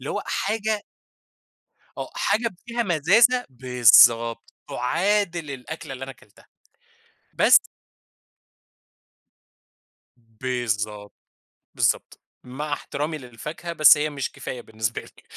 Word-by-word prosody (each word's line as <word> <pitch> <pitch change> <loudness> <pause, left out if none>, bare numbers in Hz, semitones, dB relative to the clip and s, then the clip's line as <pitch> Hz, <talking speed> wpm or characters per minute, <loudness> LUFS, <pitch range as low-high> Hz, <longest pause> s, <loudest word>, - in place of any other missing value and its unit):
اللي - - -6
هو - - -3
حاجة 215 0 -2 1.2
آه - - -5
حاجة 230 +2 0 0.2
فيها 235 0 -2
مزازة، 220 - +3
بالضبط، 115 -2 +4
تعادل 170 +3 -1
الأكلة 135 +2 -8
اللي 130 - -8
أنا 135 - -9
اكلتها 105 -4 -23 0.9
بس - - +6 2.6
بالضبط، 110 -3 -4 0.6
بالضبط. - - 0 0.2
مع 145 +4 -5
احترامي 150 +2 -4
للفاكهة، 150 +7 -8
بس 155 -2 +7
هي 150 +1 -1
مش 140 -2 -5
كفاية 125 - -7
بالنسبة 110 -1 -4
لي - - -19
140 Hz, 100 wpm, -23 LUFS, 120-175 Hz, 2.6 s, بس